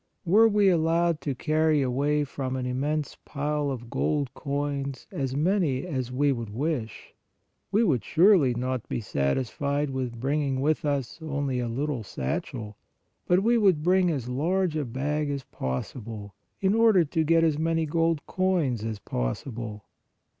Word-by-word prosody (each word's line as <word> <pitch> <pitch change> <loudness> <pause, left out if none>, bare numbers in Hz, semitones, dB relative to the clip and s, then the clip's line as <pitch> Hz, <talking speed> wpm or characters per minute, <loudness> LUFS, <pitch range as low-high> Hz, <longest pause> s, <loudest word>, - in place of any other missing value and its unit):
Were 210 +6 +6
we 205 -2 +3
allowed 170 -2 +2
to 140 -1 -2
carry 155 +1 +2
away 145 +4 +1
from 130 -2 -4
an 130 -1 -2
immense 145 +4 -2
pile 150 0 -2
of 120 -3 -6
gold 145 -4 0
coins 140 -1 -3
as 135 -1 -2
many 155 -4 +1
as 130 -8 -3
we 140 +3 +2
would 115 -4 -3
wish, 120 -1 -3 0.6
we 210 +3 +3
would 140 - +2
surely 170 - +4
not 125 0 -3
be - - -1
satisfied 130 - -1
with 125 -3 -3
bringing 135 +1 0
with 150 +3 +1
us 140 -1 -2
only 145 -4 -2
a 120 - -1
little 135 +2 -2
satchel, 105 - -4 0.5
but 180 +2 +3
we 235 +1 +4
would 185 -8 +3
bring 180 +1 +4
as 135 -7 -2
large 165 +7 0
a 150 -2 -1
bag 145 +5 -2
as 140 -2 -3
possible, 105 - -5 0.3
in 195 0 +3
order 220 -6 +5
to 160 +2 0
get 165 +1 +4
as 155 -2 +2
many 165 0 +1
gold 165 0 0
coins 170 - 0
as 110 -1 -3
possible. 105 - -4
145 Hz, 155 wpm, -27 LUFS, 125-165 Hz, 0.6 s, Were